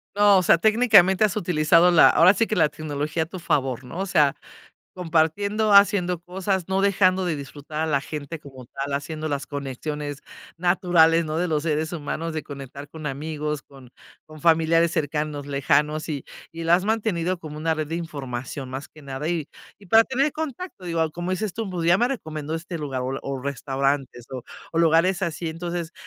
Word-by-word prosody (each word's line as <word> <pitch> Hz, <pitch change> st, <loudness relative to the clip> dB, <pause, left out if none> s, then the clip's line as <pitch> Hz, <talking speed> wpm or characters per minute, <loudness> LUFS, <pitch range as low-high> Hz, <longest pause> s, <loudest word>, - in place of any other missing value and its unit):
No, 205 Hz, -1 st, +6 dB
o 185 Hz, -, +3 dB
sea, 170 Hz, -, +5 dB
técnicamente, 215 Hz, -2 st, +5 dB
has 210 Hz, -2 st, +2 dB
utilizado 170 Hz, -2 st, +4 dB
la, 170 Hz, -, +7 dB
ahora 175 Hz, +4 st, +6 dB
sí 225 Hz, +1 st, +1 dB
que, 215 Hz, -, -1 dB
la 150 Hz, -, +3 dB
tecnología 155 Hz, +1 st, -3 dB
a -, -, -7 dB
tu 180 Hz, +3 st, -9 dB
favor, 135 Hz, -6 st, -1 dB
¿no? 150 Hz, +8 st, -8 dB
O 195 Hz, -, -1 dB
sea 150 Hz, -7 st, +3 dB, 0.6 s
compartiendo, 185 Hz, +5 st, +1 dB
haciendo 200 Hz, -3 st, +5 dB
cosas, 185 Hz, +1 st, -3 dB
no 190 Hz, 0 st, 0 dB
dejando 190 Hz, -1 st, +3 dB
de 165 Hz, -4 st, -1 dB
disfrutar 145 Hz, +2 st, -6 dB
a 160 Hz, -, 0 dB
la 140 Hz, -3 st, +1 dB
gente 150 Hz, +2 st, -6 dB
como 135 Hz, -3 st, -12 dB
tal, 140 Hz, +3 st, -5 dB
haciendo 155 Hz, +2 st, -3 dB
las 140 Hz, -1 st, -3 dB
conexiones 145 Hz, +1 st, -5 dB, 0.3 s
naturales, 170 Hz, -2 st, +3 dB
¿no?, 155 Hz, +1 st, -3 dB
de 180 Hz, -, +1 dB
los 155 Hz, -3 st, 0 dB
seres 155 Hz, 0 st, -1 dB
humanos, 165 Hz, +1 st, -4 dB
de 155 Hz, -, -3 dB
conectar 140 Hz, 0 st, -9 dB
con 155 Hz, 0 st, -8 dB
amigos, 150 Hz, +1 st, -3 dB
con 135 Hz, -3 st, -16 dB, 0.4 s
con 155 Hz, 0 st, -13 dB
familiares 165 Hz, 0 st, +3 dB
cercanos, 150 Hz, -2 st, -2 dB
lejanos, 145 Hz, +3 st, +1 dB
y 145 Hz, -4 st, -4 dB, 0.3 s
y 165 Hz, 0 st, -7 dB
la 165 Hz, +1 st, +5 dB
has 185 Hz, -, +1 dB
mantenido 200 Hz, -5 st, 0 dB
como 155 Hz, -2 st, -8 dB
una 160 Hz, +1 st, 0 dB
red 155 Hz, -1 st, -3 dB
de 165 Hz, -, -5 dB
información, 135 Hz, -5 st, -5 dB
más 130 Hz, +2 st, -6 dB
que 155 Hz, -, -17 dB
nada. 140 Hz, +2 st, -5 dB
Y 165 Hz, -4 st, -2 dB, 0.3 s
y 200 Hz, -, -17 dB
para 225 Hz, +5 st, +6 dB
tener 270 Hz, +5 st, 0 dB
contacto, 315 Hz, -, -6 dB
digo, 165 Hz, -2 st, 0 dB
como 175 Hz, +1 st, -4 dB
dices 195 Hz, +1 st, -2 dB
tú: 225 Hz, -3 st, -4 dB
"Pues, 170 Hz, -2 st, -3 dB
ya 175 Hz, -, +6 dB
me 240 Hz, +4 st, +2 dB
recomendó 155 Hz, -, -4 dB
este 170 Hz, +1 st, -6 dB
lugar 140 Hz, -5 st, -4 dB
o 130 Hz, +1 st, -3 dB
la 135 Hz, -, -4 dB
o 135 Hz, -1 st, -4 dB
restaurantes 135 Hz, -2 st, -2 dB
o 130 Hz, -2 st, -5 dB, 0.3 s
o 165 Hz, -, -1 dB
lugares 170 Hz, +3 st, +3 dB
así. 170 Hz, -1 st, -2 dB
Entonces, 170 Hz, 0 st, -5 dB
160 Hz, 195 wpm, -24 LUFS, 145-180 Hz, 0.6 s, la